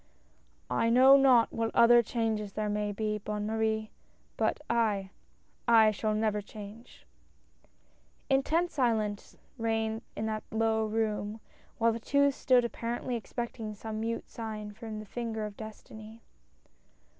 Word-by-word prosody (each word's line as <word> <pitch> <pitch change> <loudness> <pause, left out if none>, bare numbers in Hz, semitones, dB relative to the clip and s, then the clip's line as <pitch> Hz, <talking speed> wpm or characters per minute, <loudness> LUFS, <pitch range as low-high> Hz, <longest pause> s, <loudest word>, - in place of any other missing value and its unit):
"I 230 - +2
know 260 +3 +7
not 260 -4 +5
what 225 0 -1
other 235 +1 +7
changes 220 -3 -2
there 215 -1 -2
may 210 0 -1
be, 210 +1 -2
Bonne 210 0 -4
Marie 220 0 -1 0.2
— - - -38
but - - +1
I 210 -5 0 0.3
— - - -40 0.2
I 215 - +5
shall 215 +1 -1
never 215 -1 0
change! 210 +3 -12 0.6
" - - -38
Intense 315 +6 +1
silence 220 -6 -1 0.2
reigned 225 0 -1
in 215 - -3
that 215 -1 -2
low 220 0 +1
room, 215 -1 -2 0.4
while 230 -1 +3
the 230 - -4
two 280 +4 +3
stood 255 -2 +3
apparently 235 +1 -3
expecting 230 -2 -5
some 215 +1 -6
mute 230 +1 -3
sign 215 -2 -6
from 220 0 -7
the 215 - -7
finger 220 0 -4
of 210 -1 -7
Destiny. 220 +1 -11
220 Hz, 145 wpm, -30 LUFS, 215-235 Hz, 0.6 s, know